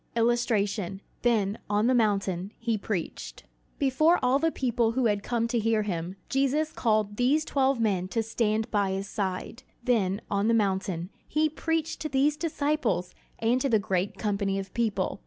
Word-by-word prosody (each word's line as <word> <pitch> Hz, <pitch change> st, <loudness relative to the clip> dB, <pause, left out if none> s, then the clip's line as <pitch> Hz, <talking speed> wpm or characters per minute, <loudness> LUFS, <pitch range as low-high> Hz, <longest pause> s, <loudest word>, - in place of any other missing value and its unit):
[Illustration: 220 Hz, -5 st, +1 dB, 0.2 s
Then, 215 Hz, -4 st, +1 dB
on 210 Hz, +1 st, +2 dB
the 255 Hz, -, +4 dB
mountain, 200 Hz, -4 st, +1 dB
he 230 Hz, -1 st, -1 dB
preached] 200 Hz, -4 st, -4 dB, 0.3 s
Before 300 Hz, +6 st, +3 dB
all 255 Hz, +2 st, +3 dB
the 325 Hz, +1 st, +2 dB
people 235 Hz, -4 st, 0 dB
who 260 Hz, 0 st, +1 dB
had 205 Hz, -2 st, +2 dB
come 230 Hz, +1 st, -1 dB
to 235 Hz, -, +1 dB
hear 220 Hz, -1 st, +2 dB
him, 180 Hz, -2 st, -3 dB
Jesus 280 Hz, +3 st, +1 dB
called 215 Hz, -3 st, +1 dB
these 285 Hz, +6 st, +2 dB
twelve 270 Hz, -2 st, +1 dB
men 195 Hz, -5 st, +1 dB
to 225 Hz, +4 st, -1 dB
stand 220 Hz, -1 st, 0 dB
by 200 Hz, -3 st, +1 dB
his 195 Hz, +1 st, -3 dB
side. 195 Hz, +4 st, -3 dB, 0.2 s
Then, 205 Hz, -6 st, +1 dB
on 200 Hz, +1 st, 0 dB
the 230 Hz, -, +4 dB
mountain, 190 Hz, -4 st, -1 dB, 0.2 s
he 310 Hz, 0 st, +2 dB
preached 325 Hz, +1 st, -2 dB
to 310 Hz, -, -3 dB
these 280 Hz, +2 st, +2 dB
disciples 300 Hz, -, -1 dB, 0.2 s
and 235 Hz, +3 st, +1 dB
to 275 Hz, -, +1 dB
the 225 Hz, -, +4 dB
great 190 Hz, -1 st, -1 dB
company 200 Hz, -2 st, -1 dB
of 195 Hz, -1 st, -6 dB
people. 210 Hz, -5 st, -1 dB
225 Hz, 170 wpm, -27 LUFS, 200-255 Hz, 0.3 s, the